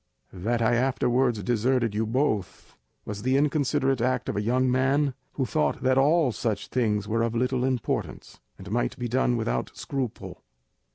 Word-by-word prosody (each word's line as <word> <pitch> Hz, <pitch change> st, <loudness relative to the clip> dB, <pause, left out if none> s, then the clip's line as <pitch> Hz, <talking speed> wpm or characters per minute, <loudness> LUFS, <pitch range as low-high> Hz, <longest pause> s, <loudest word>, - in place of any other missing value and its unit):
That 115 Hz, +6 st, -1 dB
I 115 Hz, +2 st, +3 dB
afterwards 125 Hz, -2 st, +1 dB
deserted 120 Hz, +1 st, +1 dB
you 110 Hz, +1 st, -1 dB
both 115 Hz, -4 st, -2 dB, 0.3 s
was 105 Hz, -1 st, -5 dB
the 130 Hz, +3 st, +2 dB
inconsiderate 140 Hz, -3 st, +1 dB
act 125 Hz, 0 st, 0 dB
of -, -, -2 dB
a 105 Hz, -, 0 dB
young 125 Hz, +4 st, +1 dB
man 135 Hz, +2 st, +2 dB, 0.2 s
who 135 Hz, -, -1 dB
thought 75 Hz, -, -1 dB
that 130 Hz, 0 st, +3 dB
all 145 Hz, +1 st, +3 dB
such 110 Hz, -2 st, -3 dB
things 105 Hz, -5 st, 0 dB
were 115 Hz, +1 st, 0 dB
of 115 Hz, 0 st, -1 dB
little 125 Hz, +1 st, 0 dB
importance, 130 Hz, -3 st, -3 dB, 0.2 s
and -, -, -10 dB
might -, -, -1 dB
be 120 Hz, -, -3 dB
done 120 Hz, 0 st, +1 dB
without 65 Hz, -, -1 dB
scruple. 135 Hz, -5 st, -5 dB
125 Hz, 165 wpm, -26 LUFS, 110-130 Hz, 0.3 s, I